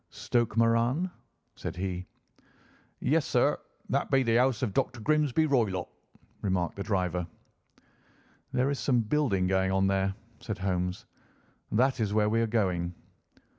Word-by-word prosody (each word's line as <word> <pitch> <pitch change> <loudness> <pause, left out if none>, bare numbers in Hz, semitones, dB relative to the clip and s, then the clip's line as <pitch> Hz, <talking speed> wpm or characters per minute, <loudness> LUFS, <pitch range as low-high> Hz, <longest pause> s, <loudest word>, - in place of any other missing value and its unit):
"Stoke 120 -2 -1
Moran?" 115 +10 +2 0.4
said - - -6
he. 90 0 -4 0.9
"Yes, - - +2
sir, - - +2 0.3
that - - 0
be 135 -1 +4
the 115 -1 +3
house 130 0 +2
of 105 -6 -1
Dr. 120 +4 0
Grimesby 150 +4 +2
Roylott," 110 - +1 0.5
remarked 90 -3 0
the 100 - -6
driver. 90 -4 -1 1.2
"There 130 +3 +1
is 140 - -2
some 125 -4 +2
building 110 -5 +1
going 95 0 +2
on 95 0 +2
there," 95 0 +1 0.2
said 110 -3 -5
Holmes; 90 -1 -2 0.7
"that 130 +4 +2
is 105 -2 0
where 105 -1 +3
we 115 +1 +2
are 115 - +1
going." 90 -6 0
110 Hz, 140 wpm, -29 LUFS, 95-125 Hz, 1.2 s, be